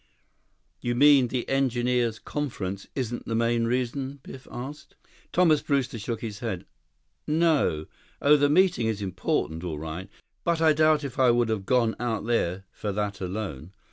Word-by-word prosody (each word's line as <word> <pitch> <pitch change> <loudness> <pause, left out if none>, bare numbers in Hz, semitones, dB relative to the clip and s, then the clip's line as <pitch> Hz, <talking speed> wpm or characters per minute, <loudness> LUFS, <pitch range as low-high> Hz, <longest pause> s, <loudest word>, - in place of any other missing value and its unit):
"You 120 0 -1
mean 140 -1 +6
the 125 0 -3
Engineers' 125 -3 +1
Conference 100 -11 -4
isn't 120 -3 -3
the 115 - -1
main 115 0 +2
reason?" 130 +3 -2
Biff 130 - -11
asked. 140 +5 -8 0.4
Thomas 160 -5 +4
Brewster 130 -5 -1
shook 115 +1 -4
his 105 -3 -5
head. 105 -7 -4 0.6
"No. 150 - +2 0.3
Oh, 145 +1 +6
the 145 -1 +3
meeting 175 -6 +3
is 105 -2 -2
important, 90 -3 -2
all 80 -4 -3
right. 80 +5 -6 0.3
But 170 -2 +1
I 160 -1 +5
doubt 155 0 +3
if 135 -2 -6
I 130 -2 +6
would 120 -1 +3
have 105 -3 -2
gone 120 -3 +2
out 115 -3 -2
there 95 -6 0
for 105 - -4
that 100 0 -3
alone. 95 -4 -5
120 Hz, 160 wpm, -26 LUFS, 105-140 Hz, 0.6 s, mean